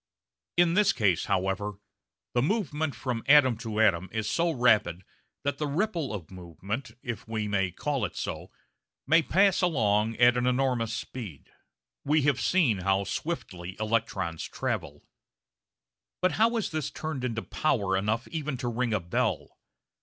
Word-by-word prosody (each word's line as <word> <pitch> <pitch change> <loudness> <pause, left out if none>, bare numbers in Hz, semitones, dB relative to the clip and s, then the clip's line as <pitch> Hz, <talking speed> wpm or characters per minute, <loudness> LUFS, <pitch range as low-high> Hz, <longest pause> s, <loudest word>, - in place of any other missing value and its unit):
In 175 -1 +4
this 205 +1 +4
case, 100 -8 +1
however, 95 +2 -1 0.6
the 120 - +2
movement 155 - -1
from 120 0 -3
atom 140 -4 +6
to 110 -2 -4
atom 95 -4 +3
is 110 -1 -2
so 170 +7 +1
rapid 110 - +2 0.4
that 140 0 -2
the 150 - -1
ripple 165 -1 -1
of 95 -7 -7
movement, 95 - -6
if 120 -3 -5
we 110 -1 -2
may 95 -2 +1
call 140 - -2
it - - -7
so, - - -5 0.6
may 160 +4 +5
pass 195 +4 +3
along 110 - +2
at 120 0 +5
an 125 0 +1
enormous 125 -3 +1
speed. 110 - -7 0.5
We 150 +1 +2
have 140 -2 +2
seen 145 - +2
how 95 +1 +1
swiftly 95 - -5
electrons 110 -7 -1
travel. - - -4 1.2
But 185 - +2
how 230 +2 +2
is 220 - -2
this 155 -3 -2
turned 155 -5 -5
into 115 -3 -2
power 100 -11 0
enough 105 +5 -1
even 150 -4 -3
to 125 -1 -2
ring 120 -1 0
a - - +1
bell? 85 -1 -2
120 Hz, 155 wpm, -28 LUFS, 105-150 Hz, 1.2 s, atom